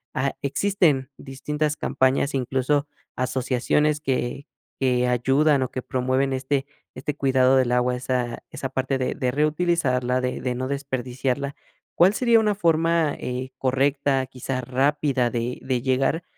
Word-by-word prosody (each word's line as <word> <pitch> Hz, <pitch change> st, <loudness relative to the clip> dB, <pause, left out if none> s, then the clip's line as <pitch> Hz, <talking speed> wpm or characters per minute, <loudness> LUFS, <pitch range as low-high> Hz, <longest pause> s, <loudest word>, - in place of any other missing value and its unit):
ah, 135 Hz, +1 st, 0 dB
existen 145 Hz, -4 st, +1 dB
distintas 150 Hz, +3 st, -3 dB
campañas, 135 Hz, +2 st, +1 dB
incluso, 135 Hz, +3 st, 0 dB, 0.3 s
asociaciones 130 Hz, +4 st, 0 dB
que 135 Hz, +1 st, -2 dB, 0.3 s
que 125 Hz, -2 st, +2 dB
ayudan, 135 Hz, +4 st, +3 dB
o 130 Hz, -, -1 dB
que 130 Hz, -, -5 dB
promueven 130 Hz, +1 st, 0 dB
este 135 Hz, +1 st, -1 dB, 0.3 s
este 140 Hz, +3 st, -3 dB
cuidado 130 Hz, -1 st, +3 dB
del 125 Hz, -2 st, +2 dB
agua, 125 Hz, 0 st, +2 dB
esa 125 Hz, -1 st, -2 dB
esa 135 Hz, -, -5 dB
parte 135 Hz, +1 st, -1 dB
de 130 Hz, -, -1 dB
de 125 Hz, -, -1 dB
reutilizarla, 145 Hz, -4 st, +1 dB
de 125 Hz, 0 st, -2 dB
de 125 Hz, -1 st, -2 dB
no 130 Hz, +1 st, -3 dB
desperdiciarla, 135 Hz, 0 st, -3 dB, 0.4 s
¿cuál 185 Hz, +4 st, +5 dB
sería 235 Hz, -2 st, +4 dB
una 210 Hz, -2 st, +1 dB
forma, 165 Hz, -3 st, +2 dB
eh, 125 Hz, +1 st, -4 dB
correcta, 135 Hz, +1 st, +1 dB
quizá, 130 Hz, 0 st, -4 dB
rápida 130 Hz, 0 st, +1 dB
de 120 Hz, +1 st, -3 dB
de 130 Hz, -2 st, -1 dB
llegar, 135 Hz, +6 st, +1 dB
135 Hz, 140 wpm, -24 LUFS, 125-145 Hz, 0.4 s, cuál